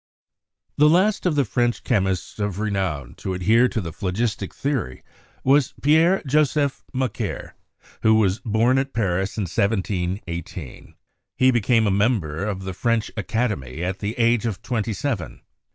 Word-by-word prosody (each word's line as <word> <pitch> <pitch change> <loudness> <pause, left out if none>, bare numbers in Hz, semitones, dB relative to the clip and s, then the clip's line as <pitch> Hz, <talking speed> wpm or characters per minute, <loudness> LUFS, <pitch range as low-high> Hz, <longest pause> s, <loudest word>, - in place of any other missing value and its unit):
The 150 +1 +6
last 185 +4 +3
of 165 - +1
the 140 -2 +2
French 120 +1 0
chemists 95 -5 -1
of 100 -3 -2
renown 95 - -2
to 95 - -4
adhere 110 +7 +4
to 115 - -3
the 85 -5 -5
phlogistic 100 +2 -2
theory 135 - -3 0.4
was 135 0 +3
Pierre 160 +6 +4
Joseph 145 0 +1
Macquer, 130 -3 -3 0.5
who 110 0 +5
was 100 -2 +2
born 120 +3 +2
at 135 0 -3
Paris 95 -3 -1
in 105 - 0
1718. 90 - -3 0.4
He 130 0 +5
became 115 -1 +2
a 100 - +2
member 100 -6 0
of 100 -2 -3
the 95 0 -4
French 115 +3 0
Academy 100 - -2
at 95 +2 -2
the 105 +2 -4
age 115 0 +2
of 105 -4 -5
twenty 115 -2 -2
seven. 100 - -3
110 Hz, 150 wpm, -23 LUFS, 95-125 Hz, 0.5 s, The